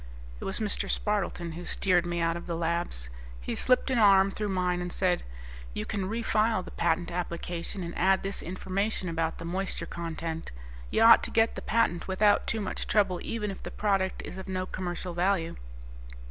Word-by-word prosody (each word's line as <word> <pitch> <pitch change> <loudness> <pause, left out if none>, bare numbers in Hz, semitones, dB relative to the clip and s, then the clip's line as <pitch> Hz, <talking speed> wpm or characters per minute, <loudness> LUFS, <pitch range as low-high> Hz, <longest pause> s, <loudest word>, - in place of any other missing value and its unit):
It - - -6
was 195 - -1
Mr. 215 -2 0
Spardleton 195 -5 -1
who 170 +2 -7
steered 180 -1 +2
me 175 -1 -1
out 165 0 +1
of 170 - -7
the 170 - -2
labs. 165 - -1 0.3
He - - -4
slipped 255 +1 +2
an 250 - +2
arm 195 -2 +6
through 210 +1 -3
mine 180 -2 0
and 180 0 -4
said, 180 -1 +1 0.5
"You - - -2
can 190 -2 -2
refile 220 -2 +1
the - - -9
patent 170 0 0
application 175 +1 -4
and 170 0 -6
add 190 +1 +3
this 195 0 -3
information 190 +2 -2
about 165 -1 -1
the - - -7
moisture 185 +3 -2
content. 165 -1 -5 0.4
You - - +3
ought 230 0 +9
to - - -3
get 225 0 +3
the - - -6
patent 175 -7 +1
without 205 +2 +3
too 220 - 0
much 195 - -3
trouble 195 -4 +2
even 210 -3 -3
if 195 - -9
the - - -6
product 195 -3 0
is 190 - -7
of 190 - -8
no 185 -1 -2
commercial 180 -1 -4
value." 175 -1 +1
185 Hz, 190 wpm, -29 LUFS, 170-200 Hz, 0.5 s, ought